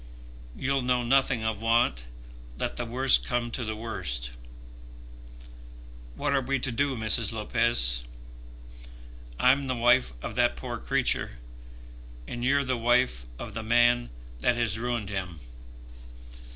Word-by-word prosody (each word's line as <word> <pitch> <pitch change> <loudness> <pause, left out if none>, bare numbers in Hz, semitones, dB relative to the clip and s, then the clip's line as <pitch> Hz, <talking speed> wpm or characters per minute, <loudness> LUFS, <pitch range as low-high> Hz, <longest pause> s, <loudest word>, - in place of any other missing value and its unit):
You'll 135 0 -1
know 125 0 0
nothing 125 -1 +2
of 110 -1 -2
want, 115 - +1 0.5
let - - -3
the 120 - -4
worst 130 +3 +5
come 120 -1 -2
to 125 - -2
the 110 -1 -4
worst. 90 - -2 1.8
What 145 -1 -1
are 135 - +2
we 135 +2 -1
to 125 0 -1
do, 135 +2 0
Mrs. 110 +1 +2
Lopez? 105 - +1 1.4
I'm 135 +2 +3
the 130 - -1
wife 120 - +3
of - - -5
that - - +2
poor 65 - -6
creature, - - 0 0.9
and 120 - -6
you're 140 +2 +2
the 130 -1 -1
wife 120 - +1
of - - -8
the 115 - -4
man 120 +2 +3 0.3
that 120 - +2
has 110 -2 0
ruined 120 -4 -3
him. 90 -5 -5
120 Hz, 135 wpm, -27 LUFS, 110-125 Hz, 1.8 s, worst